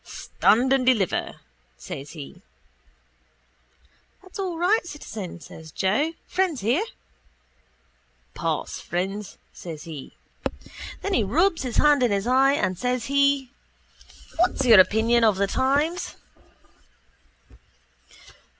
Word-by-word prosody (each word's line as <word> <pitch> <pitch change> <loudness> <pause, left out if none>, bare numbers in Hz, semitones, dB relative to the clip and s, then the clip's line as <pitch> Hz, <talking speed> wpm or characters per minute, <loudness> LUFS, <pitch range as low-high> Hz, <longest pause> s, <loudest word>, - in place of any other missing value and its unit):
—Stand 260 - +1
and 270 -1 +2
deliver, 235 -8 0 0.4
says 140 +2 -8
he. 165 +3 -10 1.8
—That's 375 +1 -11
all 365 -4 -3
right, 370 +7 +2
citizen, 220 - -8
says 160 -1 -12
Joe. 245 - 0
Friends 365 -7 -1
here. 245 - +1 1.5
—Pass, - - -3
friends, 195 +3 -4 0.2
says 160 -4 -8
he. 155 -5 -9 0.9
Then 400 - -1
he 230 - +3
rubs 330 - +2
his 250 -4 -3
hand 295 -2 +5
in 245 - +3
his 200 0 0
eye 265 +3 +4
and 185 -9 -1
says 250 -2 -1
he: 280 -2 +2 0.9
—What's 330 -5 +1
your 225 -5 +8
opinion 225 +5 +4
of 215 -3 +4
the 200 +1 +1
times? 285 - 0
250 Hz, 110 wpm, -24 LUFS, 195-295 Hz, 1.8 s, your